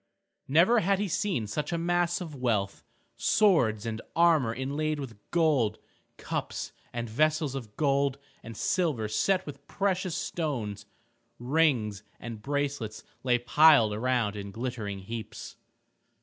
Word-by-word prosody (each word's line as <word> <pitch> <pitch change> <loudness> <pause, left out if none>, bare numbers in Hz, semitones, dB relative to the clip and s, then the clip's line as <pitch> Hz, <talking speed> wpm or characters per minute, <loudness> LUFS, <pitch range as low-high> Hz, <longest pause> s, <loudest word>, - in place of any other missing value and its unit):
Never 175 - +5
had 195 0 +2
he 205 +1 -1
seen 175 - -1
such 150 +10 -3
a 170 - 0
mass 175 +1 +1
of 165 -4 -6
wealth. 115 -7 -1 0.3
Swords 125 - +3
and 110 -1 -3
armor 160 -8 +4
inlaid 145 +5 -2
with 130 -5 -6
gold, 145 -11 +2 0.4
cups - - -4 0.2
and 120 0 -4
vessels 155 +4 +1
of 120 -6 -7
gold 140 -2 +2 0.2
and 115 -1 -9
silver 150 - 0
set 185 - +1
with 140 -1 -10
precious 185 -3 -1
stones, 115 - -3 0.5
rings 120 -7 +1 0.2
and 115 -3 -7
bracelets 140 -5 -3 0.2
lay 125 -1 +3
piled 120 -2 +5
around 115 -2 0
in 100 -1 -6
glittering 110 -2 -4
heaps. 110 +2 -7
135 Hz, 130 wpm, -28 LUFS, 110-160 Hz, 0.5 s, Never